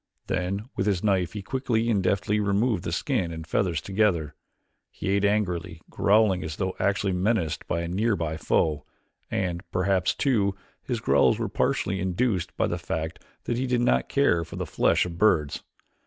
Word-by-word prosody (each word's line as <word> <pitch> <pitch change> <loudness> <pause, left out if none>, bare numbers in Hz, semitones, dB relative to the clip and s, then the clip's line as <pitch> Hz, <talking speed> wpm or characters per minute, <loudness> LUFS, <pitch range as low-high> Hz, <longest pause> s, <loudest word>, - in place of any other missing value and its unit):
Then 95 +4 -2
with 95 +1 -1
his 95 -4 +1
knife 95 -5 +1
he 105 -2 -5
quickly 120 -1 -1
and 105 -4 +2
deftly 100 +3 +1
removed 100 0 +1
the - - -3
skin 95 - -1
and 80 -1 -7
feathers 85 -1 0
together. 95 -7 +1 0.6
He - - -5
ate 100 +1 +2
angrily, 90 -6 0
growling 100 -2 +3
as 80 -1 -5
though 95 0 -2
actually 100 -1 +1
menaced 90 -3 0
by 85 - -1
a 85 - -3
near 105 +5 +1
by 80 -3 -3
foe, 75 -1 +1 0.5
and 90 -2 -1
perhaps, 95 0 +1
too, 105 -8 +1 0.3
his - - -3
growls - - +4
were - - -2
partially 95 0 0
induced 95 +1 -1
by - - +2
the - - -2
fact 80 0 -4 0.2
that 120 - -2
he 130 +1 -1
did 125 -1 +1
not 65 - +2
care 85 -1 +2
for - - -10
the - - -3
flesh - - +2
of 85 -1 -7
birds. 80 -9 +2
95 Hz, 180 wpm, -26 LUFS, 85-105 Hz, 0.6 s, growls